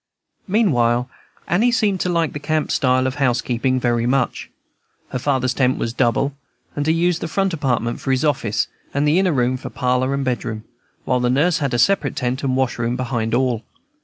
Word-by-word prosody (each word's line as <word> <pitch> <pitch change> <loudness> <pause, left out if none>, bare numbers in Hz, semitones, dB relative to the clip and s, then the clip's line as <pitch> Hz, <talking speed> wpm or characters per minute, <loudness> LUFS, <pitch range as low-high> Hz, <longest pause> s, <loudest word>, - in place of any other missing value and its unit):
Meanwhile 125 - +2 0.4
Annie 220 +8 +3
seemed 210 -6 +1
to 180 - -1
like 170 -3 0
the 145 - -4
camp 155 +1 -1
style 130 0 +2
of 130 +2 -2
housekeeping 125 0 +1
very 120 -1 +1
much. 130 -1 0 0.6
Her 125 - -3
father's 130 -2 0
tent 130 -1 +1
was 115 - -2
double, 130 +4 +1 0.4
and 145 +1 -2
he 160 - +4
used 175 +1 +1
the - - -2
front 195 +2 0
apartment 125 -6 -1
for - - -4
his 130 +3 +2
office, 120 -6 0 0.3
and 145 +1 +2
the 155 +5 +4
inner 190 -2 +2
room 130 -2 +1
for - - -7
parlor 125 +1 0
and 140 -1 -2
bedroom; 115 -3 -3 0.4
while 125 - +1
the 125 0 +1
nurse 150 +7 +2
had 140 -5 -1
a - - +2
separate 195 - +2
tent 125 0 -2
and 130 -1 0
wash 130 -2 0
room 120 +1 0
behind 120 -3 -1
all. 125 -3 0
130 Hz, 195 wpm, -20 LUFS, 125-150 Hz, 0.6 s, he